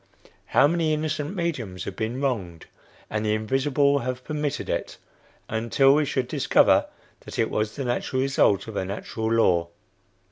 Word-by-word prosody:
How - - +4
many 160 0 +2
innocent 155 +2 -3
mediums 125 - -3
have - - -6
been 115 +4 -3
wronged? 100 - -2 0.4
and 105 0 -2
the 105 0 +1
invisible 135 +5 +1
have 125 0 -4
permitted 150 -1 -3
it, - - -3 0.5
until 115 +5 +3
we 150 +1 +3
should 130 -2 -1
discover - - +3 0.3
that - - -10
it 115 - +1
was 105 0 -1
the 135 - -4
natural 130 +1 -1
result 105 -7 +2
of 110 - -7
a - - -1
natural 110 +3 -4
law." 90 -7 +3
130 Hz, 155 wpm, -25 LUFS, 110-145 Hz, 0.5 s, How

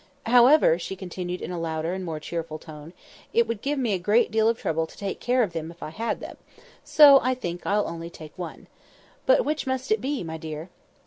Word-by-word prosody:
"However," 245 - +6
she 190 - -5
continued 180 -1 -5
in - - -5
a 175 - -4
louder 165 +1 -2
and 190 0 -4
more 160 -3 -4
cheerful 160 0 -5
tone, 155 0 -11 0.4
"it 235 0 +3
would 230 -2 -3
give 285 +1 -1
me 240 -6 0
a 190 - 0
great 210 +7 +2
deal 220 +1 +3
of 230 - 0
trouble 160 0 -1
to - - -17
take 200 -1 -4
care 250 0 +2
of 190 -6 -3
them 160 -1 -4
if 170 +1 -11
I 155 - -6
had 230 +7 -3
them; - - -9 0.5
so, 285 -3 +8
I 255 0 +1
think, 175 -8 -5
I'll 210 +1 +1
only 165 0 -6
take 155 -2 -12
one. 175 -3 -8 0.6
But - - +5
which 305 -2 -2
must 260 -1 -2
it 215 -1 +2
be, 270 -3 -2
my 160 -1 -5
dear?" 160 +2 -7
185 Hz, 230 wpm, -25 LUFS, 165-240 Hz, 0.6 s, so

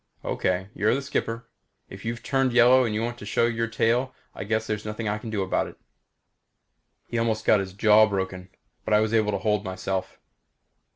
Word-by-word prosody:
"Okay 95 +1 -1
you're 105 +4 +2
the 140 - -2
skipper. 115 -3 -3 0.4
If 95 +1 -11
you've 115 +1 -4
turned 135 -2 +1
yellow 125 +1 +6
and 110 0 -1
want 120 0 -5
to - - -9
show 115 - +2
your 115 0 -1
tail 120 +3 0 0.2
I - - -6
guess 110 +1 0
there's 110 -1 -3
nothing 105 +1 -4
I 105 +1 -1
can 115 - -7
do 105 -3 -1
about 95 - 0
it." - - -13 1.3
He 120 - -3
almost 110 -1 -1
got 105 - +5
his 95 -1 -5
jaw 110 +2 +5
broken, 95 -2 -4 0.3
but 105 - +2
I - - +5
was 110 +1 0
able 110 -2 +2
to 100 - -1
hold 105 0 0
myself. 95 0 -4
110 Hz, 195 wpm, -25 LUFS, 100-115 Hz, 1.3 s, yellow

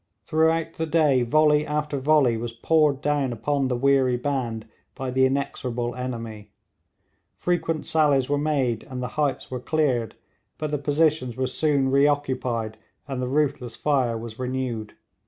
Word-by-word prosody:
Throughout 160 +1 +1
the 160 - -2
day 150 -5 +3
volley 150 +4 +3
after 150 -1 -2
volley 140 -4 +3
was 115 +1 -4
poured 145 +3 +2
down 145 -3 0
upon 135 +4 -1
the 125 -1 -1
weary 135 -1 +3
band 125 -5 -3 0.3
by 130 -1 -4
the 130 +1 +4
inexorable 125 -3 -2
enemy. 115 -4 -6 0.9
Frequent 165 -3 -1
sallies 145 -5 +2
were 145 0 0
made, 135 -7 0
and 130 -1 -6
the 125 - -3
heights 140 -2 -2
were 130 - -3
cleared, 125 -5 0 0.4
but 155 -1 -3
the 150 - -1
positions 145 -4 +1
were 130 - 0
soon 135 0 +1
reoccupied 130 -6 +1 0.3
and 135 -2 -3
the 125 - -1
ruthless 135 -4 -1
fire 130 -6 +1
was 115 0 -8
renewed. 125 -4 -3
135 Hz, 150 wpm, -24 LUFS, 125-150 Hz, 0.9 s, the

